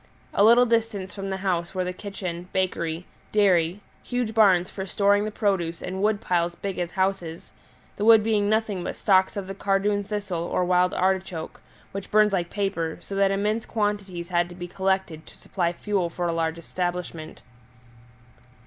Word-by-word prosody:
A 200 Hz, -, +4 dB
little 235 Hz, +3 st, +7 dB
distance 225 Hz, -5 st, -1 dB
from 195 Hz, -1 st, -5 dB
the 190 Hz, -, -2 dB
house 175 Hz, -1 st, -1 dB
were 185 Hz, -, 0 dB
the 180 Hz, 0 st, -3 dB
kitchen, 180 Hz, -3 st, -6 dB
bakery, 175 Hz, -2 st, -1 dB, 0.3 s
dairy, 185 Hz, -3 st, +3 dB, 0.2 s
huge 245 Hz, -3 st, -2 dB
barns 190 Hz, -5 st, +5 dB
for 190 Hz, -, -6 dB
storing 205 Hz, +1 st, +3 dB
the -, -, -2 dB
produce, 180 Hz, -6 st, 0 dB
and 190 Hz, +1 st, -5 dB
wood 210 Hz, 0 st, +2 dB
piles 175 Hz, -3 st, 0 dB
big 195 Hz, 0 st, -4 dB
as 175 Hz, -1 st, -1 dB
houses, 185 Hz, -3 st, -2 dB, 0.5 s
the 205 Hz, -, -2 dB
wood 225 Hz, -1 st, +7 dB
being 210 Hz, -2 st, +1 dB
nothing 215 Hz, -4 st, 0 dB
but -, -, -5 dB
stalks 190 Hz, -1 st, +3 dB
of 200 Hz, -, -3 dB
the 195 Hz, -, -6 dB
cardoon 200 Hz, +1 st, +1 dB
thistle 200 Hz, -4 st, -3 dB
or 175 Hz, +1 st, 0 dB
wild 180 Hz, 0 st, +2 dB
artichoke, 185 Hz, -3 st, -1 dB, 0.3 s
which 195 Hz, 0 st, -6 dB
burns 210 Hz, -1 st, +4 dB
like 175 Hz, -3 st, 0 dB
paper, 195 Hz, -6 st, -2 dB
so -, -, -9 dB
that 195 Hz, 0 st, +3 dB
immense 210 Hz, +3 st, -1 dB
quantities 205 Hz, -5 st, -2 dB
had 175 Hz, -1 st, +1 dB
to 175 Hz, -, -10 dB
be 175 Hz, 0 st, -6 dB
collected 190 Hz, -4 st, -1 dB
to -, -, -14 dB
supply 175 Hz, -3 st, -1 dB
fuel 185 Hz, 0 st, -1 dB
for 175 Hz, +1 st, -3 dB
a 170 Hz, -, 0 dB
large 165 Hz, 0 st, -1 dB
establishment. 175 Hz, -2 st, -4 dB
190 Hz, 175 wpm, -25 LUFS, 175-205 Hz, 0.5 s, little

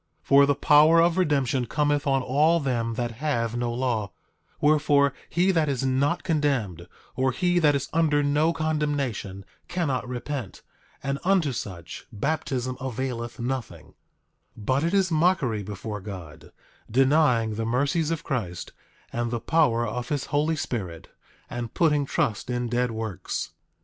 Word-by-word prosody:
For 140 Hz, 0 st, +5 dB
the 145 Hz, -, +2 dB
power 150 Hz, +4 st, +6 dB
of 170 Hz, +2 st, +3 dB
redemption 135 Hz, -7 st, +1 dB
cometh 145 Hz, +3 st, 0 dB
on 135 Hz, -1 st, +2 dB
all 150 Hz, +7 st, +3 dB
them 120 Hz, -5 st, -1 dB
that 120 Hz, 0 st, -2 dB
have 120 Hz, -7 st, -1 dB
no 120 Hz, 0 st, -1 dB
law; 120 Hz, -4 st, -1 dB, 0.5 s
wherefore, 145 Hz, -2 st, +3 dB, 0.2 s
he 180 Hz, +3 st, +2 dB
that 160 Hz, -5 st, +1 dB
is 135 Hz, -1 st, -1 dB
not 140 Hz, +6 st, +1 dB
condemned, 125 Hz, -, -1 dB, 0.3 s
or 130 Hz, +1 st, +1 dB
he 175 Hz, +5 st, +1 dB
that 150 Hz, -3 st, +4 dB
is 140 Hz, -1 st, -2 dB
under 155 Hz, -3 st, +2 dB
no 150 Hz, +3 st, +2 dB
condemnation, 145 Hz, -, -2 dB, 0.2 s
cannot 145 Hz, -9 st, -1 dB
repent; 125 Hz, -2 st, -5 dB, 0.4 s
and 140 Hz, 0 st, -2 dB
unto 180 Hz, -6 st, +2 dB
such 90 Hz, -8 st, -7 dB
baptism 130 Hz, +1 st, -2 dB
availeth 125 Hz, -2 st, -4 dB
nothing— 120 Hz, -, -4 dB, 0.7 s
8:23 105 Hz, -, -10 dB
But 130 Hz, +4 st, +1 dB
it 170 Hz, +4 st, +1 dB
is 190 Hz, -3 st, +2 dB
mockery 155 Hz, -, +2 dB
before 105 Hz, +1 st, -6 dB
God, 95 Hz, -6 st, -9 dB, 0.4 s
denying 130 Hz, -3 st, +3 dB
the 110 Hz, +1 st, -3 dB
mercies 140 Hz, +6 st, +1 dB
of 165 Hz, -2 st, -2 dB
Christ, 95 Hz, -10 st, -4 dB, 0.4 s
and 120 Hz, 0 st, -1 dB
the 120 Hz, 0 st, -2 dB
power 125 Hz, -6 st, +2 dB
of 120 Hz, +2 st, -4 dB
his 145 Hz, -3 st, -1 dB
Holy 155 Hz, +3 st, +2 dB
Spirit, 95 Hz, -, -5 dB, 0.4 s
and 120 Hz, -2 st, -6 dB
putting 150 Hz, -4 st, +2 dB
trust 110 Hz, -1 st, -1 dB
in 120 Hz, -1 st, -1 dB
dead 125 Hz, +1 st, +1 dB
works. 110 Hz, -5 st, -4 dB
135 Hz, 150 wpm, -25 LUFS, 115-150 Hz, 0.7 s, power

